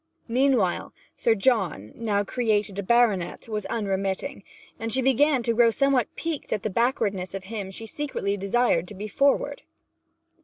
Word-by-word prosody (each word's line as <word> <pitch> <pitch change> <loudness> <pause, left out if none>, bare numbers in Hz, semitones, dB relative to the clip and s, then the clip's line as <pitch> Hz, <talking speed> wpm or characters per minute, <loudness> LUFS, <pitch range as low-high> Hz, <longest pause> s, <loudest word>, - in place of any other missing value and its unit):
Meanwhile 245 -6 +1 0.2
Sir 230 - +2
John, 195 - +1
now 210 -3 0
created 210 -3 0
a - - +1
baronet, 215 -4 +1
was 215 -2 -3
unremitting, 195 +3 -2 0.4
and 225 0 -3
she 260 - +3
began 270 +1 +3
to 230 - +2
grow 230 0 +5
somewhat 275 +1 +2
piqued 325 -3 -4
at 210 - -1
the 215 - -2
backwardness 200 -5 0
of 195 - -5
him 200 -1 -5
she 210 +4 -7
secretly 225 -5 -2
desired 200 -3 +1
to 205 - -8
be 205 +3 -5
forward. 275 - +1
220 Hz, 155 wpm, -25 LUFS, 195-245 Hz, 0.4 s, grow